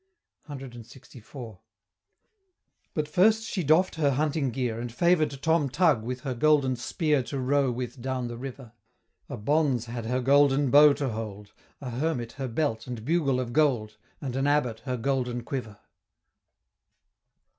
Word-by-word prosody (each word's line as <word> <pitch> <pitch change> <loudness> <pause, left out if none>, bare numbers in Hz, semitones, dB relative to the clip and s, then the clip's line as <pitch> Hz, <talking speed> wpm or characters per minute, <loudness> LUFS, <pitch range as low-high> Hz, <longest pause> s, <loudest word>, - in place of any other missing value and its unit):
CLXIV. 120 -3 -10 1.4
But 150 -1 -1
first 215 +7 +3
she 190 -4 -3
doff'd 160 +5 +3
her 150 -3 +2
hunting 145 0 0
gear, 120 -2 -2
And 120 0 -5
favor'd 155 -1 +2
Tom 160 -3 +2
Tug 150 -4 +3
with 125 +3 -5
her 135 -3 -3
golden 140 0 +3
spear 145 +4 0
To 135 +3 -5
row 135 +1 +2
with 125 +1 -5
down 130 -1 -2
the 120 - -6
river 125 -1 -8 0.6
A - - -5
Bonz 135 0 +1
had 115 -1 -6
her 125 +2 0
golden 140 +1 +3
bow 145 0 +8
to 140 -1 -2
hold; 105 -2 -7 0.3
A 130 -3 -5
Hermit 125 -2 -2
her 135 +1 -5
belt 115 -2 -2
and 120 -3 -6
bugle 145 -4 +1
of 120 -2 -4
gold; 125 -8 +1 0.2
And 130 -3 -5
an 135 +1 0
Abbot 125 -6 +1
her 130 -2 -2
golden 125 -1 -1
quiver. 115 -5 -5
130 Hz, 150 wpm, -27 LUFS, 120-145 Hz, 1.4 s, bow